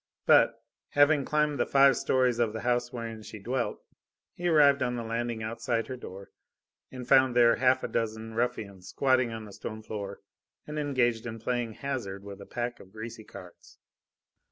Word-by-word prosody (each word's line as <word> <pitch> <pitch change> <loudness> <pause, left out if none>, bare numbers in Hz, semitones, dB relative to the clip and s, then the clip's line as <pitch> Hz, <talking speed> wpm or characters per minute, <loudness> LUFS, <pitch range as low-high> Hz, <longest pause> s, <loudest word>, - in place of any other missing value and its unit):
But, - - +5 0.3
having 145 -1 +4
climbed 150 -2 +1
the - - +1
five 135 -1 +5
stories 125 -2 +1
of 115 -3 +1
the 110 - -5
house 120 0 0
wherein 115 -2 -6
she 110 - -9
dwelt, 120 +4 -3 0.5
he 175 - -3
arrived 145 -4 +5
on 125 -1 0
the 120 - -4
landing 115 0 -3
outside 115 +1 -2
her 130 - -6
door 100 -5 -10 0.6
and 125 -1 -8
found 130 -2 +5
there 120 -1 +5
half 130 +1 +3
a - - -1
dozen 110 0 -3
ruffians 110 -6 -3
squatting 130 -1 +2
on 110 -1 -6
the 105 - -12
stone 110 +2 -7
floor 100 -2 -6 0.4
and 150 0 -5
engaged 120 -6 0
in 115 -1 -5
playing 120 0 -2
hazard 115 -8 -5
with 100 0 -9
a - - -11
pack 120 0 -4
of 95 - -15
greasy 110 +1 -8
cards. 90 -4 -14
120 Hz, 180 wpm, -28 LUFS, 110-130 Hz, 0.6 s, But